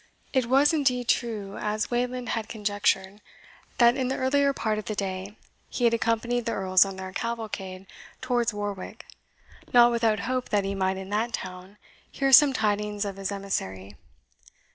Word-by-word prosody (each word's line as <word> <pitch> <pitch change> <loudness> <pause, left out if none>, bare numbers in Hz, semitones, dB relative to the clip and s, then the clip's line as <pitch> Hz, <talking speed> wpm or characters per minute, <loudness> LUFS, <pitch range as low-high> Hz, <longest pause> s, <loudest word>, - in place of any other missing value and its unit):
It 260 -3 +1
was 275 +5 +4
indeed 255 -5 +1
true, 210 -6 -1
as 215 +2 -2
Wayland 245 +1 -2
had 225 -2 -3
conjectured, 205 -2 -1 0.6
that 240 0 +5
in 260 -2 -1
the 265 - -2
earlier 280 +2 +2
part 215 -5 -1
of 215 - -8
the 215 - -3
day 195 +1 -4 0.3
he - - -4
had 235 -1 +4
accompanied 230 +1 0
the 230 - 0
Earls 185 -1 +4
on 195 -1 -6
their 190 0 -7
cavalcade 210 -5 -5 0.3
towards 245 -2 0
Warwick, 205 -2 -6 0.7
not 240 0 +7
without 225 -3 +1
hope 255 0 -2
that 205 -2 +1
he 195 - -2
might 190 -1 0
in 190 +1 -8
that 225 +3 -1
town 185 +2 -7 0.3
hear 275 -1 0
some 280 +2 +8
tidings 210 -3 -1
of 195 -1 -5
his 195 0 -3
emissary. 100 - -4
215 Hz, 165 wpm, -26 LUFS, 195-245 Hz, 0.7 s, some